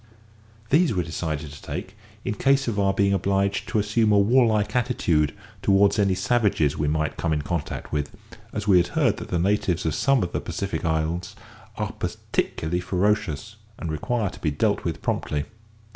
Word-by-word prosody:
These 155 - +4
we 90 - +1
decided 80 -2 -4
to 75 - -11
take 90 +6 -6 0.3
in - - 0
case 135 +5 +2
of 105 -3 -1
our 100 -1 +3
being 100 0 +2
obliged 100 +1 0
to 115 - 0
assume 105 +1 +2
a 105 - +5
warlike 110 0 +3
attitude 90 - +2 0.3
towards 100 +1 +4
any 100 -2 +3
savages 95 - +2
we 75 - -1
might 75 +1 -1
come 85 - -1
in 75 -1 0
contact 85 -3 -4
with, 75 -1 -1 0.4
as 105 0 -4
we 95 -3 +6
had 85 0 +3
heard - - +3
that - - -7
the 90 - 0
natives 90 -1 +1
of 80 - +1
some 135 - +2
of 90 - -3
the - - -2
Pacific - - -3
islands 80 +2 -1 0.4
are - - -2
particularly 80 +3 -2
ferocious, 105 +1 -1 0.2
and 85 - -4
require 105 +6 -1
to - - -12
be 80 - +1
dealt 75 - 0
with - - -3
promptly. 75 -1 -1
95 Hz, 180 wpm, -24 LUFS, 80-105 Hz, 0.4 s, we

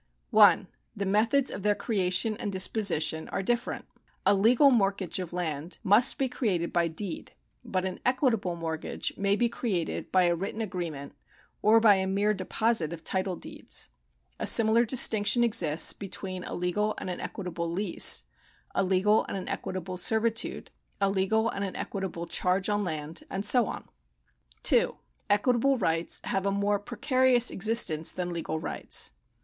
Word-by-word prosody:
L - - +6 0.3
The 200 -1 -3
methods 225 +7 +2
of - - -6
their 205 +1 +1
creation 205 0 0
and 205 - -4
disposition 185 -5 +1
are 195 - -3
different. 240 +3 -2 0.4
A 200 - +5
legal 235 +8 +4
mortgage 195 -6 0
of 180 -3 -6
land 165 -2 -4
must 215 +7 +5
be 270 - 0
created 195 -9 -2
by 170 -1 +2
deed, 170 +2 -6 0.3
but 185 -1 -3
an 185 -1 -5
equitable 245 -8 0
mortgage 160 -1 -4
may 200 0 +1
be 240 +3 +1
created 210 -8 -4
by 185 -1 +4
a 175 -1 +2
written 195 +5 -5
agreement 175 -9 -5 0.5
or 220 +2 +5
by 210 -3 +5
a 190 0 -1
mere 200 +2 +1
deposit 195 -3 -1
of 165 -1 -10
title 185 0 -1
deeds. - - -5 0.5
A - - -2
similar 225 +1 +5
distinction 230 -1 +3
exists 180 -9 +4
between 190 -2 -6
a - - -5
legal 205 +5 -1
and - - -6
an 180 - -5
equitable 175 -4 -5
lease, 175 - +3 0.5
a 195 - +1
legal 195 +3 +2
and - - -5
an 185 - -7
equitable 185 0 -5
servitude, 220 +4 0 0.3
a 195 -1 +1
legal 200 +4 +1
and 200 -3 -3
an 195 - -5
equitable 190 -4 -5
charge 185 +3 -1
on 205 0 0
land, 155 -3 -5
and 195 +2 -4
so 240 +1 +4
on. - - -7 0.8
2. - - +3 0.3
Equitable 250 +5 +2
rights 165 -5 -1
have 195 0 -2
a - - +1
more 200 +1 0
precarious 250 +2 +1
existence 195 -7 +3
than 180 -1 -4
legal 160 -1 -4
rights. - - -2
195 Hz, 160 wpm, -27 LUFS, 180-220 Hz, 0.8 s, L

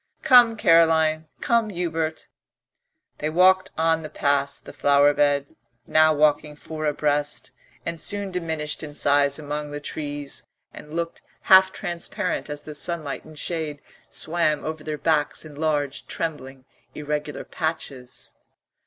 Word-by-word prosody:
Come, 240 -3 +6
Caroline, 160 -3 +4
come, 230 -2 +2
Hubert." 165 -4 -3 0.9
They 155 - -1
walked 185 +3 +4
on 160 0 +2
past 140 0 0
the - - -10
flower 145 0 +4
bed, 145 -1 +1 0.3
now 155 0 +5
walking 150 0 +2
four 155 +1 -6
abreast, 145 0 -1 0.3
and 170 -1 -3
soon 200 -1 -1
diminished 160 -4 -3
in 150 -2 -8
size 140 -1 +2
among 150 0 -5
the 145 0 -5
trees 145 -1 -5 0.3
and 150 - -11
looked 170 0 -3 0.2
half 190 0 +6
transparent 175 -4 -4
as 145 0 -6
the 155 - -8
sunlight 155 -2 -3
and 155 -1 -13
shade 155 -3 -2 0.3
swam 155 -2 0
over 155 0 -5
their 155 -1 -4
backs 155 0 0
in 155 - -11
large 145 -2 -2
trembling 135 -5 -5 0.3
irregular 150 0 -4
patches. 140 -6 -4
155 Hz, 130 wpm, -24 LUFS, 145-165 Hz, 0.9 s, Come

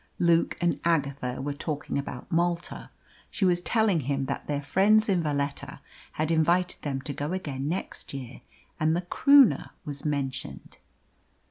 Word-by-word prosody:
Luke 170 -1 +2
and 175 -1 +1
Agatha 140 -6 0
were 145 +1 -2
talking 145 -1 -3
about 125 -3 -7
Malta. 170 +1 -1 0.4
She 195 - 0
was 175 -1 +3
telling 220 -3 +2
him 135 -1 -1
that - - -4
their 145 -1 -2
friends 205 +9 +4
in 190 -4 +2
Valetta 145 -2 -3 0.3
had 155 +1 -1
invited 170 +3 +2
them 135 -2 -3
to 145 - -4
go 145 +5 -3
again 145 -7 -3
next 180 +4 -4
year, 130 -2 -8 0.4
and 155 +1 +2
the 175 - 0
Croonah 280 +8 +5 0.2
was 145 -1 -5
mentioned. 140 -3 -4
155 Hz, 150 wpm, -27 LUFS, 140-175 Hz, 0.4 s, Croonah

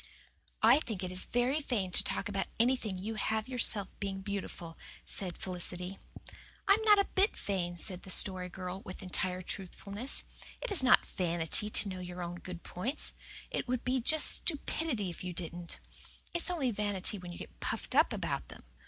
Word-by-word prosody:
"I 240 +6 +7
think 220 -9 -5
it 180 - -3
is 185 0 -1
very 245 +5 +1
vain 220 -10 -2
to - - +6
talk - - +1
about 195 -1 -2
anything 230 -5 +1
you 210 +5 -4
have 220 +1 -1
yourself 230 -6 +2
being 195 -1 -3
beautiful," 190 -4 -5 0.3
said 180 -3 -1
Felicity. 180 +1 -2 0.7
"I 395 - +8
am 430 - +1
not 425 -1 +6
a 400 - +4
bit 390 +3 +1
vain," 175 -3 -2
said 180 +1 +2
the - - -12
Story 185 -1 +5
Girl, 185 +1 -6
with 185 -1 -9
entire 185 0 -1
truthfulness. 200 +7 -4 0.4
"It - - -5
is 390 - +6
not 255 -1 +5
vanity 175 +3 +1
to 215 - +2
know 185 -1 -5
your 180 0 -6
own 175 0 -5
good 180 -1 -8
points. 240 - 0 0.4
It - - -2
would 250 -1 -2 0.2
just 310 +4 +5
be 340 - +6
stupidity 240 - -2
if 170 - -9
you 180 -1 -4
didn't. 170 0 -6 0.6
It's 345 +1 +3
only 295 -9 0
vanity 205 -1 +1
when 180 -1 -8
you 175 - -8
get - - -11
puffed - - -3
up - - +5
about - - -3
them. - - -12
195 Hz, 185 wpm, -32 LUFS, 180-245 Hz, 0.7 s, I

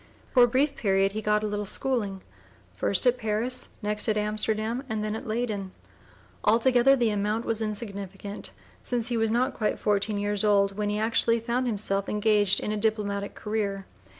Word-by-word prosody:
For 250 - +6
a - - -1
brief 275 +4 +1
period 195 -2 +2
he 215 +2 -4
got 210 0 +1
a - - 0
little 210 0 -2
schooling, 205 -3 0 0.5
first - - 0
at 250 0 +3
Paris, 225 +3 -1
next 210 +2 +3
at 215 - +1
Amsterdam, 215 +3 -1
and 220 -1 -2
then 215 0 -2
at 230 - -7
Leyden; 215 -4 -3 0.7
altogether 245 +4 +4
the 240 -4 +1
amount 210 +3 -1
was 225 -1 -2
insignificant, 200 -2 -4 0.3
since 245 -1 0
he 240 - -1
was 225 0 +1
not 250 +4 +1
quite 215 - -1
fourteen 205 0 0
years 205 0 -1
old 200 -2 +3
when 210 0 -1
he 210 - -1
actually 230 +1 +2
found 240 +2 -1
himself 200 -3 -1
engaged 210 -2 +2
in 210 - -3
a 215 - -1
diplomatic 205 -2 -1
career. 205 -2 -3
215 Hz, 180 wpm, -27 LUFS, 205-230 Hz, 0.7 s, For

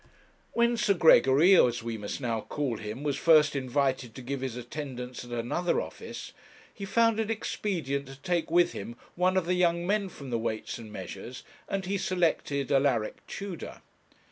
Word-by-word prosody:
When 235 0 +3
Sir 210 -3 +2
Gregory, 160 +2 +6
as 120 -7 +4
we 115 -1 -3
must 105 +3 -5
now 115 -4 -1
call 135 -4 -3
him, 110 +6 -6
was 145 -2 0
first 155 -3 +5
invited 130 -2 -1
to 130 - -8
give 135 +1 -4
his 130 -3 -3
attendance 125 -1 -6
at 120 - -12
another 120 +9 0
office, - - -7 0.4
he 200 - -6
found 230 +2 +3
it 220 -1 -1
expedient 165 - -2
to 135 - -9
take 170 +3 -1
with 175 +1 +4
him 115 +4 -7 0.2
one 185 +1 +2
of 185 - +1
the 180 - +1
young 175 -1 +2
men 200 0 +1
from 140 -6 -9
the 115 - 0
Weights 110 0 -3
and 110 -2 -10
Measures, 110 +5 -8 0.3
and 195 -1 -2
he 195 +2 -1
selected 160 -7 0
Alaric 135 -6 +2
Tudor. 195 -4 -7
140 Hz, 175 wpm, -29 LUFS, 125-180 Hz, 0.4 s, Gregory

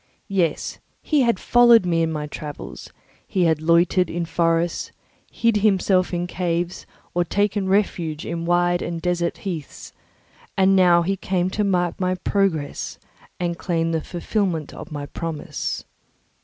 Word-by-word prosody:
Yes, 170 -5 0 0.2
he 300 -3 +2
had 235 -6 +2
followed 240 -4 +6
me 165 -2 +1
in 165 0 +1
my 150 -1 -3
travels; 150 0 -8 0.4
he 185 - +1
had 160 -2 +2
loitered 170 +2 +3
in 170 0 -2
forests, 165 +1 0 0.4
hid 230 -2 +2
himself 195 -3 +2
in 175 -1 -1
caves, 175 0 -2 0.3
or 175 - +2
taken 205 +1 0
refuge 175 -6 0
in 165 0 -3
wide 175 0 +2
and 170 -1 -3
desert 175 0 -1
heaths; 165 -7 -6 0.6
and 190 0 +5
he - - +5
now 175 -2 +5 0.2
came 185 -1 0
to 210 - 0
mark 180 -3 0
my 185 0 +1
progress 180 -6 -1 0.4
and 170 -1 -2
claim 165 -2 0
the 160 -1 0
fulfilment 175 -3 -2
of - - -9
my 145 -1 -4
promise. 165 0 -4
175 Hz, 145 wpm, -22 LUFS, 165-190 Hz, 0.6 s, followed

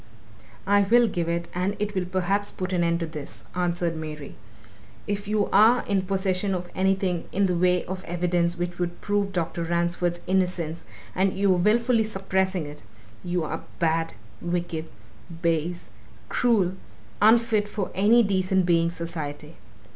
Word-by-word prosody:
"I 200 +1 +4
will 235 +4 +5
give 175 -4 -2
it, 170 0 -1
and 185 +3 -1
it 210 0 -2
will 185 -2 -1
perhaps 190 +3 0
put 185 0 -4
an 175 -1 +2
end 170 0 +1
to - - 0
this," 155 -3 -8
answered 175 -1 0
Mary. 155 -2 -7 0.7
"If 205 0 -3
you 210 -1 +1
are 225 +5 +6
in 200 -2 +1
possession 190 0 0
of 175 0 -5
anything 190 -2 0
in 200 +1 +2
the 180 -2 +1
way 180 0 +2
of 185 0 -5
evidence 175 0 0
which 175 0 -4
would 175 -1 -2
prove 205 -1 0
Dr. 170 -2 -2
Ransford's 175 +1 0
innocence 180 -3 0 0.3
and 190 0 +1
you 195 -1 +4
are - - +1
wilfully 230 +5 +3
suppressing 190 -4 -1
it, 145 0 -9 0.4
you 175 -1 -1
are 155 - -4 0.2
bad, 165 -4 0 0.3
wicked, 170 -2 -2 0.6
base, 170 +1 -1 0.4
cruel, 210 -7 +2 0.5
unfit 220 -1 +4
for 205 -2 -4
any 220 +5 +5
decent 190 -2 +1
being's 170 -1 +2
society! 155 -2 -5
180 Hz, 155 wpm, -25 LUFS, 170-200 Hz, 0.7 s, are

